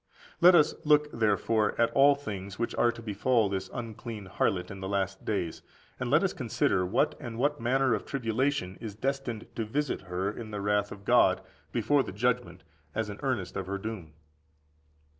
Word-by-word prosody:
Let 180 +1 +8
us 150 -3 +5
look, 150 0 +4
therefore, 110 0 +1
at 115 - +3
the 140 +1 +6
things 100 -7 -6
which 120 - -2
are 120 - +3
to 115 0 -11
befall 110 +1 +1
this 95 -1 -3
unclean 115 -2 -6
harlot 90 0 -1
in 95 - -8
the 95 0 -5
last 95 -1 -2
days; 95 -6 -2 0.4
and - - -2
(let - - +4
us - - +1
consider) 90 - +1
what 105 - +2
and 115 -2 -6
what 145 +3 0
manner 130 +1 +2
of - - -1
tribulation 125 -6 -1
is 110 -4 -6
destined 130 -2 -3
to 115 - -1
visit 140 +6 -2
her 95 +3 -1
in 110 0 -8
the 105 -1 -4
wrath 105 0 +1
of 100 0 -10
God - - +4 0.3
before 145 -1 +2
the - - -5
judgment 115 -6 -1 0.3
as 110 -1 -1
an 100 - -9
earnest 120 -10 -2
of 95 - -3
her 100 +1 -2
doom. 100 -6 -6
110 Hz, 185 wpm, -29 LUFS, 100-130 Hz, 0.4 s, Let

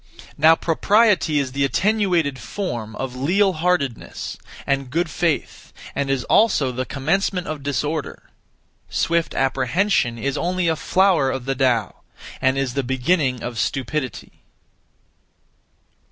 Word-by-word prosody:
Now 160 +2 +6
propriety 195 -1 +2
is 135 -3 0
the 140 +1 -1
attenuated 175 -4 +1
form 120 - -5
of 130 -1 -5
leal 185 +9 +2
heartedness 155 -7 -2 0.3
and 140 -1 -1
good 165 +4 -1
faith, 165 -1 -2 0.2
and 140 -1 -2
is 135 -2 0
also 155 - +3
the 125 0 -4
commencement 175 - -1
of 155 -2 -5
disorder; 145 +2 -3 0.6
swift 170 -1 0
apprehension 135 - +1
is 135 +4 -2
(only) 180 0 0
a 160 - +2
flower 180 -4 +2
of 130 -2 -4
the 135 - 0
Tao, 125 -6 0 0.4
and 130 +1 +2
is 135 -2 -1
the 140 - 0
beginning 130 0 0
of 120 -2 -4
stupidity. 135 +1 -3
140 Hz, 125 wpm, -21 LUFS, 130-175 Hz, 0.6 s, Now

